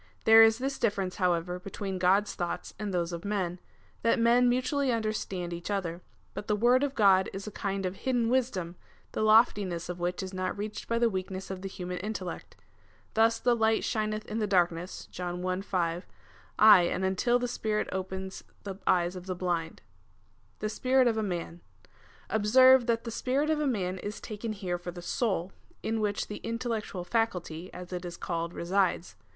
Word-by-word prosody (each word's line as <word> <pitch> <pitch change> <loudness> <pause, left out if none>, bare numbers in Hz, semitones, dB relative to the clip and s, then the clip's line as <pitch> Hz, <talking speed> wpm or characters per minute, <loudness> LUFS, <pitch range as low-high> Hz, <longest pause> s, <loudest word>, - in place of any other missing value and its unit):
There 225 0 +8
is 225 0 +6
this 270 +2 -3
difference, 200 -5 -1
however, 180 -1 0
between 195 0 -5
God's 195 +3 +3
thoughts 175 -1 -4
and 210 -2 -3
those 175 -1 -1
of 170 - -5
men, 185 -4 -2 0.4
that 230 - +3
men 240 +1 +4
mutually 260 +2 +1
understand 215 -6 -2
each 170 +2 -6
other; 180 -4 -2 0.3
but 205 - -6
the 210 - +2
word 240 +4 +4
of 280 -1 -1
God 195 -3 +5
is 195 +1 -6
a 215 - -6
kind 195 -1 -3
of 185 +1 -3
hidden 245 -1 0
wisdom, 225 -9 -1 0.3
the - - -3
loftiness 210 -6 +3
of 180 0 -5
which 175 +2 -2
is 190 0 -6
not 185 +1 -2
reached 210 +1 -5
by 230 - 0
the 235 0 +4
weakness 190 -2 -4
of 190 -1 -6
the 195 - -5
human 180 -1 -5
intellect. 195 -3 -5 0.6
Thus 225 +1 +4
the 245 -1 +3
light 220 -1 +2
shineth 215 -1 -1
in 215 +1 -3
darkness, 175 -1 0
(John 180 0 -5
i. 185 +1 -1
5,) 175 -3 -2 0.5
aye 210 -3 +9
and 180 +2 0
until 190 +6 +2
the 245 - -2
Sj^irit 220 -3 -1
opens 190 0 -5 0.2
the 195 -2 -6
eyes 175 0 +2
of 180 0 -8
the 185 - -2
blind. 175 -2 -2 0.8
The 215 - -1
spirit 255 +3 +3
of 225 -2 +1
a - - +1
man. 175 -3 -4 0.7
Observe, 255 +4 +5
that 230 -1 +1
the 230 - -5
spirit 275 +6 0
of 310 - +1
a 300 - +1
man 190 -7 -1
is 205 +2 -5
taken 215 +1 -5
here 185 -4 -3
for 175 - -7
the 175 0 -8
soul, 190 -4 -1 0.3
in 220 0 -1
which 205 -1 -1
the 210 - -6
intellectual 230 -5 -3
faculty, 180 -5 -2
as 180 0 -9
it 180 0 -4
is 175 -1 -6
called, 170 -1 -3
resides. 185 0 0
195 Hz, 185 wpm, -29 LUFS, 180-225 Hz, 0.8 s, aye